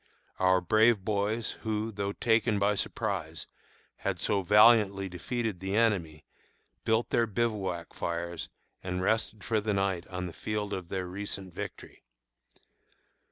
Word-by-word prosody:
Our 95 0 +4
brave 110 +2 +4
boys, 105 +2 0
who, 110 0 -2
though 100 -1 -3
taken 115 -1 +2
by 100 +1 +3
surprise, 95 -6 -2 0.5
had 100 -3 -2
so 100 +3 +1
valiantly 105 0 +5
defeated 105 +3 -3
the 95 +2 -2
enemy, 90 -9 +1 0.6
built 110 +1 +1
their 115 -1 +3
bivouac 100 -6 -2
fires 85 -1 -4 0.3
and 90 0 -3
rested 110 0 0
for 110 +2 +1
the 105 -1 0
night 95 -3 0
on 90 0 -4
the 85 - -6
field 105 +1 -3
of 90 -3 -5
their 95 -1 -2
recent 95 0 -5
victory. - - -8
100 Hz, 135 wpm, -29 LUFS, 90-110 Hz, 0.6 s, valiantly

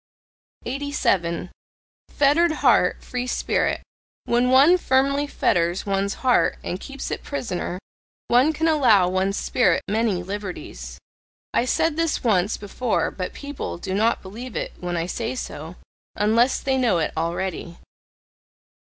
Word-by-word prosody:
87. 200 -11 -1 0.6
FETTERED 300 +4 +3
HEART, 245 -11 +3
FREE 250 0 -4
SPIRIT - - 0 0.4
When 240 +1 +2
one 285 +8 +6
firmly 275 0 +2
fetters 175 -8 0
one's 200 0 -1
heart 250 - +3
and 180 - -4
keeps 275 +4 -7
it - - -3
prisoner, 185 -10 -4 0.5
one 255 +6 +4
can 320 +1 -1
allow 240 - +4
one's 190 +2 0
spirit 245 -5 +2
many 210 -4 0
liberties: 180 - -7 0.6
I 240 - +2
said 315 +4 +1
this 330 -1 0
once 205 -4 +2
before 215 +4 -1
But 185 -1 -5
people 285 -8 -6
do 185 +2 -5
not 220 +4 +1
believe 225 +6 -8
it - - -3
when 175 -1 -3
I 165 - -1
say 230 +7 -3
so, 160 - -6 0.4
unless 230 +5 +3
they 265 -1 0
know 240 -8 +2
it 160 - -1
already. 170 +1 -3
225 Hz, 135 wpm, -23 LUFS, 180-265 Hz, 0.6 s, one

